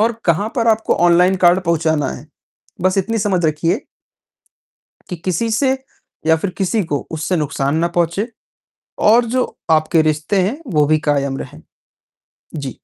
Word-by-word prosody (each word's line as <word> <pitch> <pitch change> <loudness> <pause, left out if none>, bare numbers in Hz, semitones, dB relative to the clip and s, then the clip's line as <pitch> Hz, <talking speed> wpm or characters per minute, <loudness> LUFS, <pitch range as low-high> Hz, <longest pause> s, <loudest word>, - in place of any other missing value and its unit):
और 230 +2 +3
कहाँ 180 +5 +1
पर 230 -1 +2
आपको 220 0 +2
ऑनलाइन 180 +2 +4
कार्ड 175 +2 +5
पहुँचाना 160 -3 +1
है। - - -10 0.6
बस 185 +1 +2
इतनी 225 +4 -1
समझ 195 -4 0
रखिए 165 - -1 1.2
कि 180 - -5
किसी 185 +6 -2
से, 260 +4 +2 0.5
या 160 0 +5
फिर 185 +4 -3
किसी 200 +3 +1
को 145 -3 -2
उससे 160 +3 -2
नुकसान 140 -1 -1
ना 170 +1 +1
पहुँचे, 175 +7 0 0.7
और 230 +3 +5
जो 255 -1 +2 0.3
आपके 160 +1 +3
रिश्ते 155 +5 0
हैं, 205 +9 -1
वो 150 -7 +2
भी 155 0 +3
कायम 140 -1 0
रहें। 80 -11 -9 0.9
जी। 140 -4 -5
170 Hz, 155 wpm, -18 LUFS, 155-205 Hz, 1.2 s, कार्ड